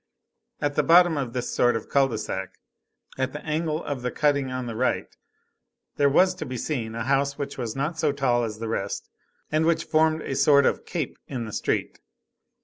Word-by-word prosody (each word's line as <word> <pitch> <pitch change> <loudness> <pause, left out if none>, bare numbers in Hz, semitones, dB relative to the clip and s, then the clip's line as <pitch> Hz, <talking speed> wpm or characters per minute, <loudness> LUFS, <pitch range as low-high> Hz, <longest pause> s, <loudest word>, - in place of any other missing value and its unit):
At 145 -1 0
the - - +3
bottom 175 0 +6
of 130 -5 -3
this 125 -1 -3
sort 120 -1 +3
of 115 - -4
cul 140 -1 +3
de 115 -4 -4
sac, 95 -3 -4 0.6
at 130 0 -1
the 150 - -7
angle 155 +1 -1
of 140 -3 -4
the 125 - -1
cutting 140 -1 +1
on 130 -1 -3
the 115 -2 -5
right, 125 +3 -1 0.8
there 140 -1 +4
was 185 +6 +4
to - - +1
be 130 0 -4
seen 115 -4 -3
a 115 - -2
house 140 +1 +1
which 140 - -4
was 120 -4 -4
not 150 +5 -2
so 155 -2 +2
tall 130 -4 +1
as 110 -2 -4
the 115 +1 -5
rest, 100 -3 -3 0.4
and 155 +1 +2
which 165 -1 +2
formed 160 0 +2
a - - -3
sort 140 +1 +5
of - - 0
cape - - -3
in 125 -4 -4
the 110 - -8
street. - - -1
135 Hz, 210 wpm, -25 LUFS, 120-150 Hz, 0.8 s, bottom